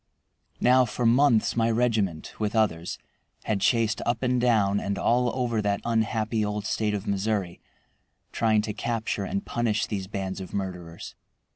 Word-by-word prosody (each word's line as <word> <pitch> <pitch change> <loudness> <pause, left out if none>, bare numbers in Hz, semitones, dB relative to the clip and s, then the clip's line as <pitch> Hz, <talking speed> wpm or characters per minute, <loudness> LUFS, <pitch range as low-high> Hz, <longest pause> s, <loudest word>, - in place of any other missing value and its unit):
Now 130 +1 +5
for 120 +1 -3
months 120 -1 +4
my 115 -1 +2
regiment, 110 -8 0
with 105 0 -1
others, 90 -6 0 0.5
had 105 -3 -1
chased 115 -1 +2
up 120 +1 -1
and 125 -1 +1
down, 105 -5 +3
and 100 0 -3
all 125 +1 +2
over 120 -4 0
that 100 -1 0
unhappy 110 -1 0
old 105 0 -3
State 105 -1 0
of 100 0 -5
Missouri, 100 -3 -1 0.7
trying 110 -2 +2
to 105 -1 -3
capture 110 -2 -2
and 200 +1 -3
punish 115 -3 0
these 95 -3 -4
bands 95 -1 -4
of 95 - -7
murderers. 90 -4 -5
110 Hz, 155 wpm, -26 LUFS, 100-120 Hz, 0.7 s, Now